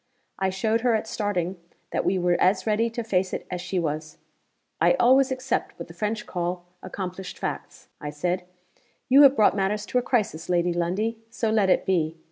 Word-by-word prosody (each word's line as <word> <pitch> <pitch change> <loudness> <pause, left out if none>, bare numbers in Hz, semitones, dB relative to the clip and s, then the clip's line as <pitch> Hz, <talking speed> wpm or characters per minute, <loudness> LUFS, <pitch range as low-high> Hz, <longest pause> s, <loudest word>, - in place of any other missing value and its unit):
I 190 0 +1
showed 220 +4 0
her 240 -2 +3
at 220 - -1
starting 190 -4 -2 0.3
that - - 0
we 190 - +1
were 175 -1 +2
as 185 0 +3
ready 225 +1 +1
to 230 +1 -4
face 190 -4 0
it - - -4
as 180 -1 -3
she 185 - -3
was. 155 -2 -3 0.6
'I - - +5
always 265 - +4
accept 260 -1 -2
what 170 - -7
the - - -10
French 210 +5 -3
call 175 0 -3 0.2
accomplished 185 0 -6
facts,' - - -6
I 150 - -5
said. 175 +5 -1 0.7
'You 270 +3 +8
have 280 -1 +8
brought 210 -4 +4
matters 205 +1 0
to 250 - +1
a - - -1
crisis, 210 -11 -1
Lady 175 0 +2
Lundie. 195 +7 -1
So 225 -1 -1
let 210 -3 +3
it - - +3
be. 165 -4 0
190 Hz, 195 wpm, -25 LUFS, 175-225 Hz, 0.7 s, You